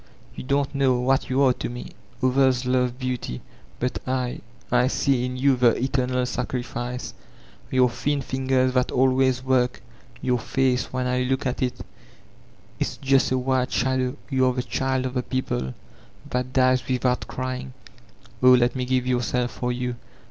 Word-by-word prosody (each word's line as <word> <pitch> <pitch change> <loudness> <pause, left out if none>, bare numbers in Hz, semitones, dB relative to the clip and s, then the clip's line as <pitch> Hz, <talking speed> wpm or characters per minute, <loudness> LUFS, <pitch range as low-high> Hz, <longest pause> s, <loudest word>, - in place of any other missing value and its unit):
You - - -7
don't 140 +1 0
know 135 -3 +2
what 130 +2 +1
you 130 +2 +3
are 130 -2 +5
to - - -5
me. 120 0 -7 0.3
Others 130 -1 +3
love 125 -1 +1
beauty, 125 - -3 0.4
but 125 +1 -1
I 125 -1 -2
— 120 - -28
^I 125 +1 +4
see 135 -3 +1
in 125 0 -4
you 135 +1 +3
the 125 -2 +4
eternal 125 -1 0
sacrifice; 125 0 -4 0.6
your 130 -1 +4
thin 135 +4 -1
fingers 130 -1 +1
that 125 -1 +2
always 130 0 +2
work, 130 -1 +1 0.4
jrour 125 -1 +1
face— 130 +1 0
when 130 0 -2
I 125 0 +1
look 130 +2 -1
at 125 -1 -2
it, 125 -1 -2 0.9
it's - - -2
just 135 -2 +3
a 130 - +2
white 130 0 0
shadow; 130 0 0 0.2
you 130 -1 +3
are 125 - +2
the 125 0 -2
child 130 0 -1
of 130 - -3
the 125 - 0
people, 125 - -3 0.6
that 125 0 -1
dies 130 0 +3
with* 130 0 -1
out 125 0 +2
ciying. 130 0 -4 0.7
Oh, 130 0 +8
let 120 0 +3
me 130 -1 -1
give 130 0 +1
myself 125 -1 0
for 125 0 -2
you. 125 0 -3
130 Hz, 170 wpm, -24 LUFS, 125-130 Hz, 0.9 s, Oh